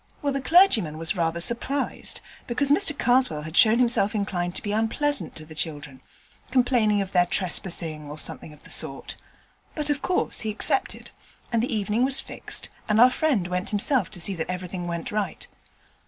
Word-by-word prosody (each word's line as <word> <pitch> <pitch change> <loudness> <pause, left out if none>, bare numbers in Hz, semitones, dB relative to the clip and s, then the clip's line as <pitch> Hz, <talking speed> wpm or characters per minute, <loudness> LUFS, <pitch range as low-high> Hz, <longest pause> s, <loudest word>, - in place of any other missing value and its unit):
Well, 285 -1 0
the 275 - -2
clergyman 255 - +4
was 165 +5 -1
rather 165 -1 -1
surprised, 240 +8 -1 0.3
because 275 +4 +1
Mr 300 -2 +3
Karswell 245 -11 +2
had 155 +2 -8
shown 220 +3 +6
himself 230 -4 +3
inclined 180 -4 -2
to - - -4
be 205 - -3
unpleasant 225 +7 0
to 155 - -4
the 155 - -12
children 150 -4 -5 0.5
complaining 245 -5 +2
of 190 - -10
their 180 -1 +3
trespassing, 170 -4 -1
or 150 - -8
something 155 - -2
of 150 - -17
the - - -8
sort; - - 0 0.6
but 300 -1 -1
of 285 -1 -2
course 365 - 0
he 220 - -1
accepted, 215 - -1 0.4
and 230 -2 +1
the 250 - -2
evening 215 +1 0
was 265 0 +3
fixed, - - -3 0.2
and 215 +1 +3
our 250 +2 +7
friend 260 - 0
went 180 +1 -3
himself 235 +5 +2
to 190 - -6
see 195 +3 +2
that 165 -1 -5
everything 180 -1 -5
went 170 -1 -4
right. 210 -1 -3
210 Hz, 185 wpm, -24 LUFS, 175-250 Hz, 0.6 s, our